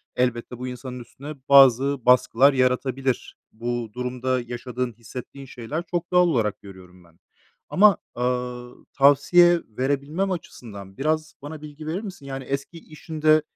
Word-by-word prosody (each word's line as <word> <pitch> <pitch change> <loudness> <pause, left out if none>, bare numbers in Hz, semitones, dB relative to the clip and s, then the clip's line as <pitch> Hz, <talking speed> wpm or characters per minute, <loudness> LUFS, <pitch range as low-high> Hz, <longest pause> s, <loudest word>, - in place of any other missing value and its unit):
elbette 125 -1 -1
bu 125 +1 -5
insanın 125 0 -7
üstüne 140 +5 -9 0.2
bazı 135 -1 +6
baskılar 125 +2 +5
yaratabilir. 130 0 -1
Bu 120 0 -4
durumda 125 0 -2
yaşadığın, 120 0 -5
hissettiğin 125 +4 -10
şeyler 135 +6 -5
çok 175 0 -2
doğal 180 0 +5
olarak 110 - 0
görüyorum 95 -2 -14
ben. 85 0 -24 0.5
Ama, 205 -1 +5 0.2
ııı, 125 0 -3
tavsiye 170 +5 +5
verebilmem 140 - -2
açısından 100 - -8
biraz 155 +2 -1
bana 150 +1 -8
bilgi 150 +1 -10
verir 175 +5 -2
misin? 190 -9 -9
Yani 135 -1 -6
eski 140 +5 -5
işinde, 155 0 +1
130 Hz, 135 wpm, -24 LUFS, 120-155 Hz, 0.5 s, bazı